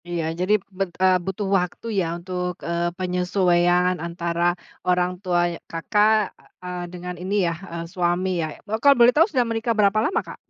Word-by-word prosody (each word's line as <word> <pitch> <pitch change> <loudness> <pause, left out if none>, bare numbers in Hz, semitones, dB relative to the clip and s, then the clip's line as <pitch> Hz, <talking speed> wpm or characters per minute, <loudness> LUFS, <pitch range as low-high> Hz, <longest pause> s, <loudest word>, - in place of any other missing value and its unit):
Iya 170 -1 -2 0.2
jadi, 185 +3 +2 0.2
bet 195 -1 -1
eee, 185 -1 +5
butuh 190 +1 -3
waktu 180 +4 -4
ya, 180 - +1
untuk, 180 0 -3 0.2
eee, 170 0 0
penyesuaian 180 -1 +2
antara 170 0 -2 0.4
orang 180 0 +2
tua 180 -3 +1
ya - - -8
Kakak, 210 +5 +2 0.3
eee, 180 -1 -5
dengan 180 0 -6
ini 190 +3 -2
yah, 170 -1 -1
eee, 170 0 -5
suami 180 +1 0
ya? - - 0 0.4
Kalau 280 -2 +6
boleh 240 +1 +7
tahu 330 +7 +4
sudah 255 -7 +1
menikah 230 +1 0
berapa 205 0 +3
lama, 350 - +1
Kak? - - -8
180 Hz, 170 wpm, -23 LUFS, 175-200 Hz, 0.4 s, boleh